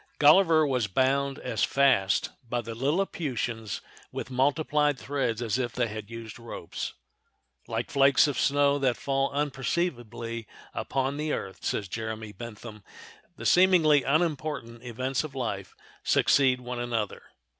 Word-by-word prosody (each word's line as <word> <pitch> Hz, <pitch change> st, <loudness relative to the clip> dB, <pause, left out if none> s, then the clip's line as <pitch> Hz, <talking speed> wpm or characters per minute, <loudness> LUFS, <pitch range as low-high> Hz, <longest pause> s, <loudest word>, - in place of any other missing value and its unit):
Gulliver 160 Hz, +1 st, +6 dB
was 125 Hz, -6 st, 0 dB
bound 135 Hz, +6 st, +1 dB
as -, -, -2 dB
fast 135 Hz, -9 st, +3 dB, 0.2 s
by 120 Hz, 0 st, 0 dB
the 115 Hz, 0 st, -6 dB
Lilliputians 125 Hz, -, -2 dB, 0.3 s
with -, -, -6 dB
multiplied 145 Hz, +2 st, +2 dB
threads 125 Hz, -5 st, -2 dB
as 115 Hz, +2 st, 0 dB
if 120 Hz, -3 st, -2 dB
they 125 Hz, -, +1 dB
had 105 Hz, -1 st, -7 dB
used 115 Hz, -1 st, -8 dB
ropes. 115 Hz, 0 st, -6 dB, 0.7 s
"Like -, -, -3 dB
flakes 135 Hz, -1 st, +5 dB
of 140 Hz, -5 st, -1 dB
snow 140 Hz, +2 st, +3 dB
that 130 Hz, -3 st, +1 dB
fall 135 Hz, 0 st, 0 dB
unperceivedly 125 Hz, -, -2 dB, 0.3 s
upon 135 Hz, +1 st, -1 dB
the 150 Hz, 0 st, -1 dB
earth," 95 Hz, -, -5 dB
says 100 Hz, -, -1 dB
Jeremy 110 Hz, +1 st, -5 dB
Bentham, 110 Hz, -1 st, -9 dB, 0.5 s
"the -, -, -9 dB
seemingly 175 Hz, -6 st, +5 dB
unimportant 150 Hz, -6 st, -1 dB
events 130 Hz, +3 st, -2 dB
of 150 Hz, -3 st, -8 dB
life 100 Hz, -7 st, -4 dB, 0.3 s
succeed 130 Hz, -2 st, +3 dB
one 125 Hz, 0 st, -5 dB
another." 115 Hz, -4 st, -2 dB
130 Hz, 135 wpm, -28 LUFS, 115-145 Hz, 0.7 s, Gulliver